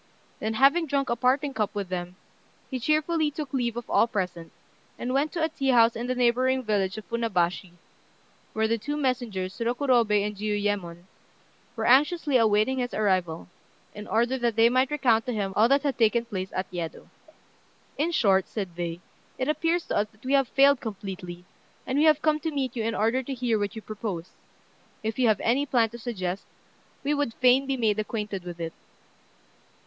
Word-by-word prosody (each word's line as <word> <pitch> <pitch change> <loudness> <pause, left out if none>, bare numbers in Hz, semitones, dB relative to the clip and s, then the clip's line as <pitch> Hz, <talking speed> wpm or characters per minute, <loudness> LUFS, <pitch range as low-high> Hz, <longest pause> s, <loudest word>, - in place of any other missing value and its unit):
Then, 220 +1 -2
having 280 +7 +4
drunk 275 -2 0
a - - +2
parting 265 +4 +1
cup 215 -3 -2
with 200 -3 -3
them, 180 0 -4 0.6
he 260 - -2
cheerfully 305 +3 +1
took 295 -2 -6
leave 240 -3 -1
of 240 - -5
all - - +3
present, 180 -6 -4 0.5
and 250 +1 -3
went 285 +3 +1
to 335 -3 -1
a - - +3
tea 275 -3 -3
house 235 -2 +5
in 235 +2 -4
the 255 - -1
neighbouring 255 +2 +2
village 200 -4 0
of 215 - -7
Funabashi, 185 -6 -1 0.8
where 220 0 +1
the 230 +1 0
two 290 +7 -3
messengers, 235 -9 -2
Rokurobei 235 -4 +2
and 210 0 -4
Jiuyémon, 205 -4 -2 0.7
were 225 -1 -2
anxiously 295 +3 +3
awaiting 220 +3 +2
his 245 -1 -3
arrival, 185 -6 0 0.5
in 210 0 -9
order 240 +4 +1
that 235 -2 0
they 225 +1 +5
might 255 +1 +2
recount 250 -5 +2
to 250 - -1
him 200 -3 -2
all 220 +2 +5
that 275 0 +3
had 280 -3 -1
taken 230 +1 +3
place 190 -5 -4
at 185 - -2
Yedo. 170 -2 -5 0.9
"In 305 +4 0
short," 195 - +3
said 190 -6 -5
they, 170 0 -4 0.4
"it 255 - -2
appears 330 +3 0
to - - -2
us 205 - +1
that 220 +3 -23
we 265 - 0
have 275 -2 +4
failed 275 0 +4
completely; 185 -5 -7 0.4
and 265 +2 0
we 305 - +4
have 305 -2 +4
come 305 -1 +2
to 320 - -2
meet 270 -5 -3
you 235 - -2
in 225 0 -1
order 230 +4 +1
to 270 +1 -5
hear 240 -3 0
what 205 +1 -3
you 220 - -7
propose. 200 -5 -5 0.7
If 220 +3 -3
you 250 - +4
have 215 -3 +3
any 270 +5 +1
plan 230 -4 +2
to 235 - -9
suggest, 195 -6 -4 0.6
we 290 +2 +1
would 285 -6 -1
fain 255 +2 +4
be 270 -1 -1
made 220 -3 +1
acquainted 210 -3 -4
with 175 -1 -7
it." 165 -1 -4
230 Hz, 195 wpm, -26 LUFS, 205-265 Hz, 0.9 s, house